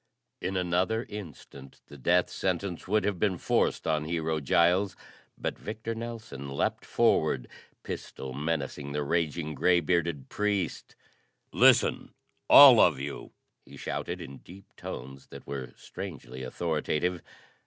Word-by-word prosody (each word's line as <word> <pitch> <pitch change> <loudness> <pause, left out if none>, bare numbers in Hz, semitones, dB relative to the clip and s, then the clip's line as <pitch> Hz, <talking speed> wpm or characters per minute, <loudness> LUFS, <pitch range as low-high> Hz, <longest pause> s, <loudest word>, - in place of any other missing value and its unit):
In 95 +1 -2
another 90 +6 0
instant 75 -8 -10
the - - -13
death 90 +6 +2
sentence 95 -1 -2
would 105 +1 +2
have 100 -3 -1
been 95 -2 +1
forced - - 0
on 75 -1 0
Hero 80 -1 -1
Giles, 90 +7 +2 0.4
but - - -4
Victor 110 +1 -5
Nelson 110 - -7
leaped 70 - -2
forward, 60 -2 +2 0.4
pistol 65 -1 -6
menacing 70 -1 -3
the 75 0 -1
raging 80 0 -1
gray 90 +4 +3
bearded 85 -4 -1
priest. 100 -6 -2 0.6
"Listen, - - +4 0.3
all - - +10
of - - +5
you!" 70 +1 -6 0.3
he - - -14
shouted - - -4
in 70 0 -9
deep 95 +2 -15
tones 65 +2 -8
that - - -11
were 65 -3 -6
strangely 65 +2 -8
authoritative. 80 +5 -1
85 Hz, 130 wpm, -28 LUFS, 70-95 Hz, 0.6 s, all